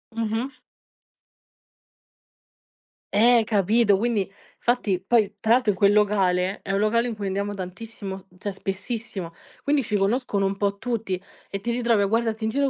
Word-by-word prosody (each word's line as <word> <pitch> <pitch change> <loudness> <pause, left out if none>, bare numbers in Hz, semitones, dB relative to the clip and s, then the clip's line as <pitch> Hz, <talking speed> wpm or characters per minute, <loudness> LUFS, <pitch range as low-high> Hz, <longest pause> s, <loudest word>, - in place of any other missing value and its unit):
Mh-mh. 230 +4 -2 2.6
Eh, 230 +2 +6
capito, 210 +1 +3
quindi 215 -3 0 0.3
fatti 225 -7 +1
poi 210 0 +2
tra 220 +2 +3
l'altro 240 -4 +3
in 190 - -6
quel 200 +1 +5
locale, 195 -2 +2
è 195 - -3
un 195 - +2
locale 230 +3 +2
in 235 - -3
cui 205 -2 -4
andiamo 200 +2 -2
tantissimo, 195 +1 -6
s 190 - -15
cioè 205 +2 -4
spessissimo, 195 -1 -5 0.3
quindi 290 0 +2
ci 210 - -2
conoscono 205 0 +1
un 195 0 -1
po' 200 0 0
tutti 220 -6 -2 0.3
e 195 - -4
ti 235 - -2
ritrovi 235 -3 +2
a 200 - +3
guardarti 225 +1 0
in 220 - +1
giro 275 +3 +1
210 Hz, 160 wpm, -24 LUFS, 195-230 Hz, 2.6 s, Eh